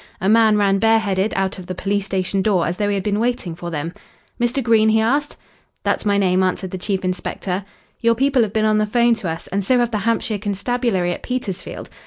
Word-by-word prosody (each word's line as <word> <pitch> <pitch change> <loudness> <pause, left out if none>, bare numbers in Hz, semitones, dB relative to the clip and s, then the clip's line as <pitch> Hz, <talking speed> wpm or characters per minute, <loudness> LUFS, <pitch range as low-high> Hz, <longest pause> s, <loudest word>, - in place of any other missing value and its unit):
A 190 - -1
man 220 0 +5
ran 195 -1 +2
bare 225 +1 +4
headed 200 -1 0
out 195 0 -1
of 180 - -10
the 185 - -4
police 200 +2 -1
station 190 0 -1
door 190 -4 +2
as 175 +2 -2
though 205 - 0
he 205 - 0
had 195 - -2
been 210 -1 0
waiting 235 -7 -1
for 175 +1 -7
them. 165 +1 -4 0.5
"Mr. 240 +3 +1
Green?" 225 -2 +4
he 220 0 +3
asked. 285 +7 0 0.5
"That's - - 0
my 200 0 +3
name," 185 -2 +2
answered 185 0 -1
the 185 - -5
chief 190 0 -2
inspector. 185 +1 -3 0.4
"Your 230 -1 +3
people 270 +1 +2
have 220 -3 0
been 215 0 +1
on 215 0 +3
the 215 - +1
'phone 235 +2 +3
to 195 -6 -4
us, 165 0 -5
and 200 +1 -1
so 250 +6 +3
have 240 -1 +1
the 215 - -1
Hampshire 225 0 0
Constabulary 205 -2 -1
at - - -5
Petersfield. 240 -7 -4
205 Hz, 235 wpm, -20 LUFS, 190-230 Hz, 0.5 s, man